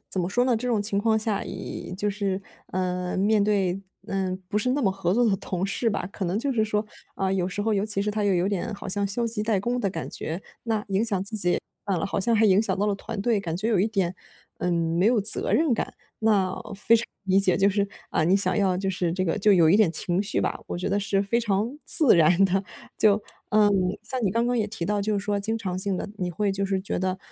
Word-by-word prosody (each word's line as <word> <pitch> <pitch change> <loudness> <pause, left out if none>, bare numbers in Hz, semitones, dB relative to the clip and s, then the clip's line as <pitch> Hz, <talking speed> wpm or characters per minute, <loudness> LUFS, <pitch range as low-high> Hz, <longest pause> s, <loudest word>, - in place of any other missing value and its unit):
怎 190 - -1
么 175 - -1
说 245 +5 +2
呢？ 250 -3 +2
这 250 - -4
种 225 -4 +1
情 205 -1 0
况 220 +1 +2
下， 215 -2 -1
也 - - -6
就 205 +2 -1
是， 200 -1 -2 0.3
呃， 180 0 -2
面 205 +2 +3
对， 195 -3 +1 0.3
呃， 190 -1 -1
不 210 - 0
是 250 +4 +1
那 285 +2 0
么 195 - +3
合 190 -1 -1
作 240 +2 +3
的 200 -3 +2
同 185 -1 -3
事 230 +4 0
吧， 205 - -2
可 195 - -4
能 175 +3 -1
就 275 +4 -1
是 220 -3 +2
说， 210 0 -1 0.3
呃， 190 0 0
有 185 -2 0
时 205 +2 -3
候， 220 - +1
尤 200 +1 0
其 205 -2 0
是 210 - -1
他 210 0 -1
又 200 -2 +3
有 180 +2 +1
点 200 +1 -2
好 200 0 -8
像 200 +1 +1
消 220 +5 -1
极 225 -2 -2
怠 215 -3 +1
工 240 +5 -1
的 200 - +1
感 165 -3 -5
觉， 165 +5 -5 0.2
那 220 -2 -1
影 195 +3 +1
响 200 -5 0
自 215 +2 -3
己 180 -4 +2 0.3
算 195 -2 +1
了 - - -2
好 - - -2
像 230 +4 +2
还 220 - +4
影 195 -1 +5
响 195 -4 -1
到 205 - +1
了 205 - +1
团 200 +1 -6
队。 230 -1 +2
感 170 -4 -3
觉 215 +5 -2
有 220 -5 +2
一 200 - +3
点， 190 -5 -1 0.4
嗯， 180 - 0
没 170 +3 +1
有 235 -1 +4
责 210 +2 0
任 310 -3 +3
感， - - -3 0.3
那 200 -4 +2 0.2
非 225 +3 +4
常 230 - -1 0.2
理 190 0 +4
解。 190 -2 +2
就 200 0 +4
是 200 0 0 0.2
啊 - - +1
你 180 +4 +4
想 200 - 0
要 190 -3 +2
就 190 +1 -1
是 180 -3 -1
这 185 +1 -1
个 170 +3 0
就 210 +1 +4
有 170 -4 +5
一 190 - +6
点 210 -6 +4
情 175 +2 0
绪 210 - -1
吧， - - -1
我 - - -3
觉 180 - -2
得 200 - +1
是 200 0 +1
非 200 +4 0
常 225 +5 -1
自 285 - +4
然 170 +4 +5
的。 195 +1 +1 0.4
就， 210 -1 +4 0.3
嗯， 210 -1 +5 0.3
像 250 +3 -4
你 195 - +2
刚 230 +2 +1
刚 245 0 +1
也 215 - +1
提 190 -5 -5
到 205 +1 0
就 215 +1 0
是 - - -2
说 205 -1 0
经 220 +3 -1
常 185 -4 -3
性 190 0 -1
地， - - -4
你 180 -2 -2
会 205 +4 0
就 195 +1 -1
是 195 -1 0
觉 190 - -3
得 185 +1 -1
200 Hz, 290 characters per minute, -25 LUFS, 185-215 Hz, 0.4 s, 一